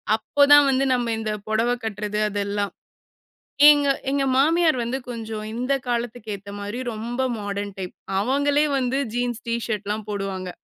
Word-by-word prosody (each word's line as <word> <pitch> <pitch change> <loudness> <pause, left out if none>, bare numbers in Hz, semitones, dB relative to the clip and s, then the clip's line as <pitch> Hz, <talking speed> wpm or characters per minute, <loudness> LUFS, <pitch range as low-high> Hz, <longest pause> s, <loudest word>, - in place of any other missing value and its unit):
அப்போதான் 285 +6 +5
வந்து 270 0 +2
நம்ம 240 -2 0
இந்த 220 -1 -2 0.2
புடவ 220 +2 +1
கட்டுறது 210 -1 -3
அதெல்லாம். 200 0 -2 1.0
ஏங்க 290 -1 +6 0.2
எங்க 275 0 +1
மாமியார் 315 +2 +3
வந்து 240 +3 -2
கொஞ்சம் 220 -2 -5
இந்த 250 +4 -1
காலத்துக்கு 235 -2 -3
ஏத்த 200 +1 -11
மாரி 205 +4 -5
ரொம்ப 235 +4 -4 0.2
மாடர்ன் 205 -1 -4
டைப், 185 -1 -5 0.3
அவங்களே 285 +6 +2
வந்து 260 0 0 0.2
ஜீன்ஸ் 245 -1 -2
டிஷர்ட்லாம் 215 -2 -2
போடுவாங்க. 195 -2 -4
230 Hz, 135 wpm, -23 LUFS, 205-260 Hz, 1.0 s, ஏங்க